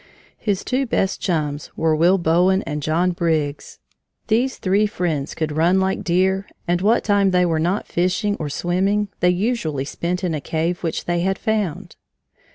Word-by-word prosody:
His 200 -3 -1
two 265 +1 -1
best 190 -4 0
chums 150 -5 -2
were 160 -1 +2
Will 175 +5 +4
Bowen 180 +3 +2
and 150 -1 -4
John 165 +5 +1
Briggs. 160 -4 -2 0.5
These 245 +4 +1
three 200 +3 +2
friends 170 -8 -2
could 155 -1 -2
run 170 +5 +3
like 190 0 0
deer, 190 +3 +1 0.2
and 175 +1 +1
what 220 +5 +3
time 200 -2 +3
they 180 -1 +3
were 165 -2 0
not 180 +6 0
fishing 185 +4 0
or 150 -2 -3
swimming 195 +6 0
they 180 - +3
usually 180 - -1
spent 180 +5 -3
in 175 -3 0
a 150 - -3
cave 165 +5 -2
which 165 -2 -3
they 175 0 0
had 190 +2 0
found. 215 -8 -2
180 Hz, 170 wpm, -21 LUFS, 160-195 Hz, 0.5 s, Will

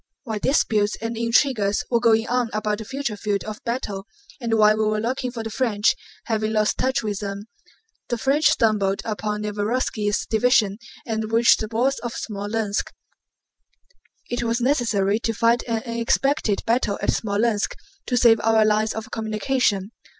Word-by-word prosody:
While 220 -4 -4
disputes 210 -5 +1
and 230 +1 -4
intrigues 230 -3 +1
were 235 - +3
going 225 -1 +3
on 245 -1 0
about 210 0 -1
the 220 - -7
future 270 -3 -3
field 205 -1 -2
of 215 0 -8
battle, 220 -5 -4 0.3
and 230 -3 0
while 215 -1 +5
we 215 0 0
were 215 0 0
looking 250 +3 -2
for 235 -2 -6
the 225 - -5
French—having 220 -1 -1
lost 215 -1 +1
touch 260 -1 +1
with 205 -2 -2
them—the 225 - -8
French 275 +6 +1
stumbled 205 -4 +1
upon 210 -1 -3
Nevérovski's 210 0 -1
division 220 -3 +2 0.3
and 220 -1 -3
reached 230 +1 +5
the 215 - -3
walls 255 +5 +1
of 240 -2 -5
Smolénsk. 205 0 -2 1.4
It 240 0 -2
was 235 0 0
necessary 225 -6 +1
to 225 -1 -2
fight 230 +2 +3
an 225 -2 -1
unexpected 235 0 0
battle 225 -3 +1
at - - -2
Smolénsk 210 0 0 0.3
to 250 - +1
save 230 -2 +5
our 220 0 +3
lines 215 +1 +1
of 220 0 -6
communication. 220 -2 0
220 Hz, 155 wpm, -23 LUFS, 210-240 Hz, 1.4 s, while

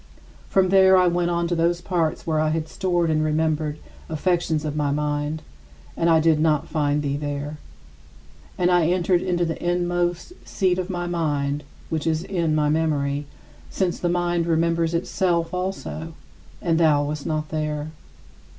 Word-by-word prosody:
From 190 -1 +3
there 190 0 +6
I 185 - +5
went 175 0 +1
on 170 0 0
to 175 - -1
those 170 +1 +1
parts 175 -3 -1
where 155 -2 0
I 155 0 +2
had 160 0 -1
stored 175 -2 0
the - - +2
remembered 155 -1 0 0.3
affections 160 -1 0
of 150 -1 -3
my 150 -1 0
mind, 150 +1 -2 0.5
and 170 - +1
I 165 -1 +5
did 160 -1 +3
not 155 -2 +2
find 150 -2 0
thee 140 0 -1
there. 145 +1 -4 1.0
And 180 0 +2
I 175 -3 +4
entered 180 0 +2
into 175 -2 0
the 165 -1 -4
inmost 175 - -1
seat 185 -2 0
of 185 +1 -3
my 175 -2 -2
mind, 150 -4 -1 0.3
which 160 -1 -2
is 160 0 0
in 170 -5 0
my 150 -1 +2
memory, 145 -2 0 0.4
since 185 -3 -1
the 175 - 0
mind 175 -1 0
remembers 165 0 +1
itself 170 -1 0
also 180 -3 -4 0.5
and 165 -2 +2
thou 150 -3 +4
wast 145 0 -4
not 155 -1 -2
there. 150 -1 -3
165 Hz, 165 wpm, -23 LUFS, 150-175 Hz, 1.0 s, there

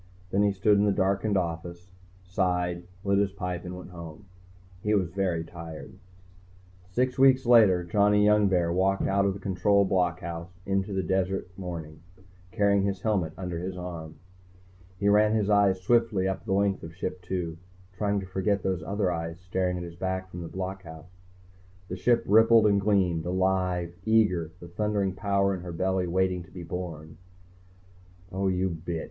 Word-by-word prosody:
Then 100 - +2
he 105 0 +3
stood 100 +1 +3
in 105 - +3
the 105 - +3
darkened 100 +1 +1
office, 85 +1 -4 0.3
sighed, 90 -1 -1 0.2
lit 100 0 +2
his 100 -1 +1
pipe 90 -3 -4
and 90 0 -7
went 90 0 -10
home. 85 +1 -10 0.6
He 105 +2 +1
was 90 -5 0
very 90 -4 0
tired. 85 -2 -9 1.0
Six 125 +6 -1
weeks 130 -1 +5
later, 110 -7 +6
Johnny 105 +3 +3
Youngbear 95 -5 +3
walked 95 +2 +1
out 100 0 +2
of 100 -1 0
the - - -8
Control 100 +1 +2
blockhouse 85 -2 -1 0.2
into 95 +1 -1
the 95 -1 0
cold - - -8
desert 95 -1 -1
morning, 85 -5 -7 0.5
carrying 100 -2 +2
his 100 -1 -2
helmet 95 -8 0
under 90 -3 -4
his 90 +1 -5
arm. 85 -3 -7 0.8
He 100 - +1
ran 105 +1 +4
his 105 -1 +1
eyes 100 -2 +4
swiftly 105 -1 +2
up 95 - -3
the - - -1
length 100 0 +1
of 80 0 -9
Ship 90 0 -5
II, 85 -3 -3 0.4
trying 100 0 0
to - - -7
forget 95 +1 -1
those 95 -2 -1
other 100 -2 -1
eyes 85 0 -4
staring 90 0 -1
at 90 - -5
his 85 -1 -8
back 95 +1 -3
from 90 - -7
the 85 - -6
blockhouse. 90 -3 -7 0.8
The 90 - -3
Ship 120 +6 +2
rippled 115 +1 +6
and 100 -1 +3
gleamed, 90 -5 +1
alive, 90 -1 0
eager, 100 -7 +2
the 85 - -10
thundering 100 +1 -1
power 100 0 +1
in 95 - -5
her 90 0 -7
belly 95 +1 0
waiting 90 0 0
to 90 - -20
be 90 -1 -8
born. 80 -2 -7 1.1
_Oh, 95 0 0
you 95 0 0
bitch! 85 0 -4
95 Hz, 175 wpm, -27 LUFS, 90-100 Hz, 1.1 s, later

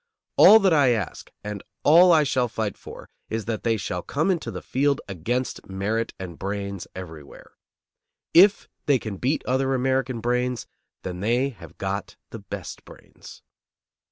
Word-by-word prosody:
All 220 - +9
that 195 -5 +3
I 140 -5 +4
ask 105 -7 -4
and 105 -1 -5 0.2
all 175 +4 +7
I 160 -2 +5
shall 130 -3 +1
fight 110 -3 -3
for - - -11 0.2
is 110 -1 -3
that 110 -1 -3
they 115 -1 +1
shall 90 -2 -4
come 155 - 0
into 165 -10 -2
the 90 -5 -7
field 140 +1 +1
against 110 +9 -3
merit 105 +4 -2
and 90 -3 -8
brains 100 -1 -4
everywhere. 80 -6 -10 0.8
If 195 +4 +6 0.2
they 140 -2 +5
can 110 -5 -6
beat 135 +9 -1
other 130 +1 +1
American 130 -1 0
brains, 125 +1 -1 0.4
then 90 -1 -5
they 120 +7 +1
have 125 - -14
got 95 +1 -4 0.2
the - - -7
best - - -8
brains. - - -15
120 Hz, 155 wpm, -24 LUFS, 100-135 Hz, 0.8 s, All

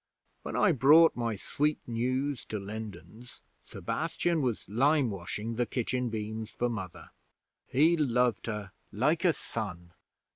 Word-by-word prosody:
'When - - -6
I 195 - +4
brought 155 +4 +6
my 115 -2 -1
sweet 150 +9 0
news 130 +3 -1
to 110 - -4
Lindens, 110 +2 -9 0.2
Sebastian 170 -3 -1
was 125 -5 -1
limewashing 115 - 0
the 120 -1 +1
kitchen 125 +1 -1
beams 110 0 -4
for 120 +3 -1
Mother. 95 -7 -6 0.6
He 155 +6 +4
loved 125 -7 +1
her 105 -3 -4 0.2
like 150 - +1
a 180 - +5
son. 90 - -6
120 Hz, 130 wpm, -30 LUFS, 105-140 Hz, 0.6 s, brought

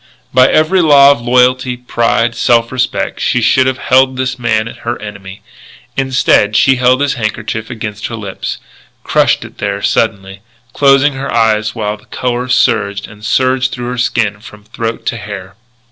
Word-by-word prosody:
By 130 0 +5
every 180 +4 +3
law 140 -3 +6
of 140 - -1
loyalty, 125 +1 +2
pride, 120 -1 0
self 115 0 +1
respect, 130 -1 -2
she 125 - +1
should 130 +3 +3
have 130 -1 -1
held 130 0 +2
this 130 -1 -2
man 110 -2 0
her 115 +1 -6
enemy. 100 -2 -10 0.5
Instead, 130 -5 +2
she 135 +4 +4
held 125 +2 +2
his 145 -1 +1
handkerchief 110 -1 -4
against 105 -4 -5
her 115 - -6
lips, 100 -4 -6 0.5
crushed - - +1
it - - -14
there 100 -1 -3
suddenly, 95 -3 -1 0.3
closing 140 +1 +3
her 135 +1 -5
eyes 110 -2 +1
while 105 -2 -3
the - - -23
colour 125 0 -3
surged 100 -5 +1
and 105 0 -15
surged 130 +2 +1
through 120 -1 -5
her 125 - -4
skin 105 -4 0
from 105 -2 -14
throat 115 +1 -5
to 115 - -2
hair. 100 -2 -8
120 Hz, 165 wpm, -13 LUFS, 105-130 Hz, 0.5 s, law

